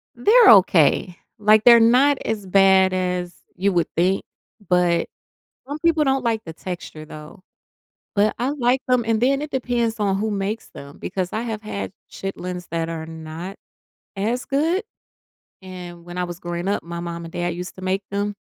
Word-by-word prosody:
They're 455 +1 +6
okay. 180 -3 +4 0.2
Like, 215 +1 +5
they're 235 -1 +9
not 260 +5 +4
as 210 -3 -2
bad 190 0 +4
as 180 -1 -2 0.2
you 195 +1 0
would 170 -2 +1
think, 185 +3 +2 0.5
but 180 -2 +2 0.6
some 290 +2 -4
people 320 -2 +3
don't 270 -2 +1
like 225 -2 +1
the 165 - -7
texture 170 -4 -7
though, 155 +5 -12 0.7
but 210 +1 +2
I 250 +4 0
like 260 -2 +1
them 250 -2 +3
and 225 -1 +1
then 275 +3 +2
it 300 - -5
depends 240 -3 -1
on 195 -2 +1
who 215 +1 -1
makes 205 +2 -3
them 140 0 -12
because 185 -2 -4
I 220 - -2
have 220 -2 -4
had 200 -2 -5 0.2
chitlins 180 -2 -6
that 165 -1 -2
are 160 -1 -5
not 160 +4 -8 0.6
as 230 +6 -1
good, 325 +8 0 0.8
and 175 -2 -9
when 175 +1 -8
I 180 - 0
was 175 0 -7
growing 175 +2 -4
up 205 - 0
my 170 0 -6
mom 170 -1 -6
and 165 - -10
dad 175 -1 -2
used 180 +1 -7
to 185 - -11
make 190 +1 -1
them 205 +1 -2
195 Hz, 180 wpm, -22 LUFS, 175-230 Hz, 0.8 s, they're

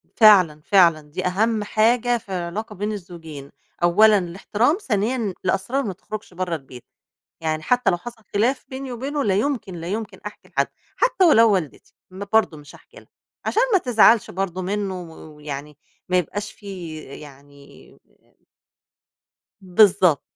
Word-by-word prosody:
فعلًا، 185 -9 +6
فعلًا 170 -3 +4
دي 185 +4 -4
أهم 210 +4 +1
حاجة 235 +3 +2
في 215 - -16
العلاقة 190 +4 -4
بين 205 +3 -3
الزوجين، 165 -8 -9 0.3
أولًا 210 +5 +6
الاحترام، 205 - 0
ثانيا 225 - -1
الأسرار 215 +9 0
ما 205 -6 -3
تخرجش 215 +1 -9
برّا 180 -1 -2
البيت، 130 -5 -11 0.6
يعني 155 -1 -2
حتّى 250 +7 +2
لو 175 - 0
حصل 225 +4 -11
خلاف 245 +6 +1
بيني 265 0 -6
وبينه 275 +4 -3
لا 195 -3 +1
يمكن، 220 -4 -2
لا 165 0 -7
يمكن 205 0 -5
أحكي 210 - -9
لحد، - - 0 0.3
حتّى 485 -7 +3
ولو 230 -9 +6
والدتي 175 -7 -4 0.2
برضه 200 -2 0
مش 145 0 -14
هأحكي - - -20
لها، - - -15 0.4
عشان 460 - +2
ما 385 - +5
تزعلش 230 - +4
برضه 185 -1 -3
منّه 190 -1 -3
ويعني 150 -3 -9 0.3
ما 180 - +3
يبقاش 205 +5 -3
في 180 -6 -8
يعني 140 0 -14 1.6
بالضبط. 185 -4 +4
195 Hz, 140 wpm, -22 LUFS, 170-220 Hz, 1.6 s, فعلًا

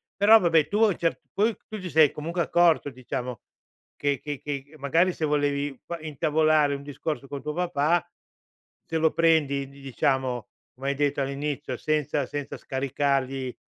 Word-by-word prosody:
però 215 +2 +7
vabbè 165 -4 +3
tu 205 - -1
a 220 - +7
un 190 - -2
certo 165 -1 -1
poi 215 +2 +2
tu 215 -1 -6
ti 185 -1 -6
sei 155 -3 +5
comunque 170 +4 -3
accorto 165 -3 +3
diciamo 125 -1 -5 0.6
che 140 -2 0
che 145 -2 -5
che 145 +1 -6
magari 165 +6 +2
se 160 - -2
volevi 145 -2 0
p 170 - -5
intavolare 155 -1 +2
un 140 - -8
discorso 145 0 -5
con 140 0 -6
tuo 150 - -4
papà, 175 -1 +1 0.8
se 165 - -2
lo 160 0 +3
prendi 145 -5 +2
di 140 0 -16
diciamo 130 -2 -1 0.3
come 135 +2 -3
hai 140 - 0
detto 145 0 0
all'inizio 140 -1 -3
senza 150 -1 0
senza 145 -1 -5
scaricargli, 135 -1 -1
145 Hz, 165 wpm, -26 LUFS, 140-160 Hz, 0.8 s, però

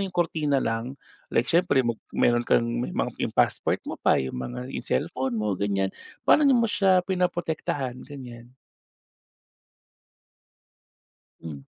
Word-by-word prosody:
yung 195 -2 -4
kurtina 150 -5 +1
lang, 115 +3 -2 0.3
like 115 - +2
siyempre 165 -6 +2
mo 120 - +1 0.2
meron 120 0 +3
kang 115 - +4 0.2
may 125 - -2
ma - - +2 0.2
yung - - -2
passport - - +1
mo - - -6
pa, - - +4
yung 65 -1 -3
mga 125 - -5
yung - - -5
cellphone 130 - -1
mo 105 -2 0
ganyan, 100 -1 0 0.3
paano 295 -1 +5
mo 235 - +3
siya 190 -4 +3
pinaprotektahan 165 -8 -2
ganyan? 120 -4 -10 2.9
Hmm. 80 -4 -7
130 Hz, 135 wpm, -26 LUFS, 115-175 Hz, 2.9 s, paano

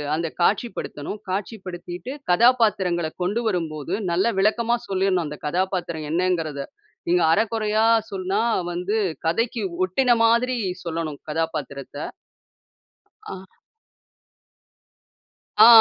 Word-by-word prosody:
அந்த 165 0 -2
காட்சிப்படுத்தணும். 200 -3 -1
காட்சிப்படுத்திட்டு, 185 +1 -5 0.2
கதாபாத்திரங்கள 195 -7 +3
கொண்டு 215 +6 0
வரும்போது, 165 -4 -2 0.2
நல்லா 190 +7 +2
விளக்கமா 235 +3 +2
சொல்லிரணும் 190 -3 +1
அந்த 150 0 -6
கதாபாத்திரம் 175 -2 -1
என்னங்கிறத! 165 -5 0 0.4
நீங்க 175 0 +4
அரகுறையா 220 0 +1 0.3
சொன்னா, 195 +2 -1 0.3
வந்து 185 +5 -1 0.3
கதைக்கு 230 +6 0 0.2
ஒட்டின 240 +6 +3
மாதிரி 240 +2 +3 0.3
சொல்லணும். 160 -3 -3
கதாபாத்திரத்த. 150 -3 -3 1.3
ஆ. 190 0 -11 2.0
ஆ, - - +9
185 Hz, 85 wpm, -23 LUFS, 165-220 Hz, 2.0 s, ஆ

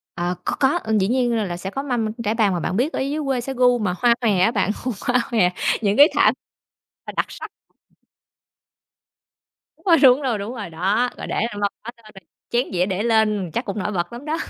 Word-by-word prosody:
Ờ, 175 +1 -2
có, - - -1
có, 280 +6 +2 0.2
dĩ 190 - +1
nhiên 245 +1 +1
là 220 - 0
là 175 -3 -4
sẽ 190 +2 -5
có 270 +7 -4
mâm 245 -5 -1 0.2
trải 210 - 0
bàn 215 -4 +2
mà 175 - -1
bạn 185 - -2
biết 270 +8 0
ở - - -2
dưới 280 +3 -2
quê 265 -3 0
sẽ 270 +3 -5
gu 250 -1 +3
mà 190 -5 -1
hoa 240 -1 +4
hòe 210 -6 +2
á 185 +5 +4
bạn, 205 -2 0
gu 255 - -1 0.2
hoa 245 0 +3
hòe 200 -7 +3 0.3
những 205 -1 +1
cái 290 - +9
thảm - - +4 0.8
đặc - - +1
sắc. - - -9 2.3
Đúng - - -29
rồi, 335 -3 +5
đúng 260 +1 +6
rồi, 250 -6 -1
đúng 205 +5 -5
rồi, 205 -6 -6
đó, 195 +9 0
rồi - - -7
để - - -3
lên 220 -3 -2
mâm 200 - +1
hết, 235 - -6
cho 230 - -24
nên 215 - -15
là 195 - -12 0.3
chén 240 +2 0
dĩa 180 0 +2
để 195 +1 -2
lên 215 -6 +1
chắc - - -2
cũng 200 +1 -4
nổi 210 - -2
bật 175 +1 -3
lắm 240 +4 -9
đó. 310 +2 -1
225 Hz, 240 wpm, -21 LUFS, 195-250 Hz, 2.3 s, cái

